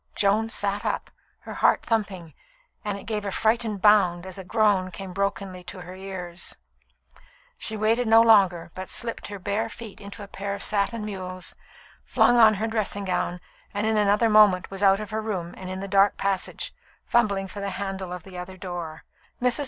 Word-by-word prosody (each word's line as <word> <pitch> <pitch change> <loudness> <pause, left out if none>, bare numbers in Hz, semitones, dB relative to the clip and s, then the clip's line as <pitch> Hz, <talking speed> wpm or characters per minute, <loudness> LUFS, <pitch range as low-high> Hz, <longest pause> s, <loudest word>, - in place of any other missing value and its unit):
Joan 210 +2 +2
sat 205 -2 -1
up, - - -2 0.3
her - - -8
heart - - +3
thumping, 195 -8 -2 0.5
and 205 -2 -2
it - - -10
gave 215 -2 -2
a 200 - -2
frightened 220 0 0
bound 190 -4 +5
as 190 0 -7
a - - -6
groan 200 -2 +2
came 190 0 -8
brokenly 195 -1 -2
to 180 +1 -8
her 180 +1 -9
ears. 185 -2 -6 1.0
She 220 - -4
waited 225 +3 +2
no 225 +1 +7
longer, 190 -7 +4
but 185 0 -7
slipped 230 -1 -3
her 205 - -6
bare 205 +4 -2
feet 220 -2 -10
into 200 +1 -9
a - - -9
pair 200 +1 -4
of - - -4
satin 210 +2 +1
mules, 185 -3 -6 0.5
flung 245 - +4
on 220 -2 +7
her 215 +3 -1
dressing 215 -3 -1
gown, 180 -1 -1 0.4
and 205 +1 0
in 220 0 +2
another 210 +2 +3
moment 210 -4 +5
was 195 0 -6
out 195 -1 +5
of 215 0 -6
her 220 0 -1
room 185 -6 -4
and 185 -1 -8
in 185 0 -4
the 195 - -4
dark 195 +1 +4
passage, 195 -1 -2 0.3
fumbling 200 -5 +2
for 200 - -8
the 200 0 -2
handle 190 -2 -4
of 180 -2 -6
the 185 -2 -9
other 185 +1 -8
door. 175 -4 -6 0.4
Mrs. 250 +2 +2
200 Hz, 190 wpm, -25 LUFS, 185-215 Hz, 1.0 s, no